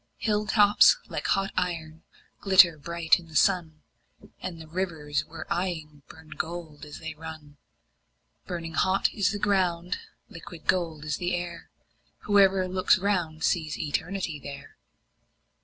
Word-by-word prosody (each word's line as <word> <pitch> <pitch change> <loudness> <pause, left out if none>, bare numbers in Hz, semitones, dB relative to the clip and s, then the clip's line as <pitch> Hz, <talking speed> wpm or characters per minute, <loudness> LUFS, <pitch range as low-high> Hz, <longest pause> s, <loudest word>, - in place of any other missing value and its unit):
Hill 210 -1 0
tops 210 - +6
like - - -3
hot 195 0 +1
iron 165 -3 -3 0.4
glitter 185 -4 +6
bright 170 +2 +2
in 170 - -14
the 160 - -14
sun, 165 -4 +2 0.6
And 175 -3 -6
the 160 - -10
rivers 160 -4 -2
we're 165 - -9
eying 160 -5 -3
burn 160 -1 -15
to - - -8
gold 160 -3 -6
as 150 - -9
they 160 -1 -6
run; 155 -2 -10 0.9
Burning 165 -2 -5
hot 190 +3 +2
is 200 -2 +1
the 205 - -3
ground, 180 -4 0 0.3
liquid 165 0 -11
gold 165 -5 0
is 150 -2 -2
the 180 0 -1
air; 175 -1 -6 0.5
Whoever 195 -2 +4
looks 185 0 +3
round 175 -5 -1
sees 160 -4 0
Eternity 165 +1 -3
there. 140 0 -10
170 Hz, 140 wpm, -27 LUFS, 155-185 Hz, 0.9 s, tops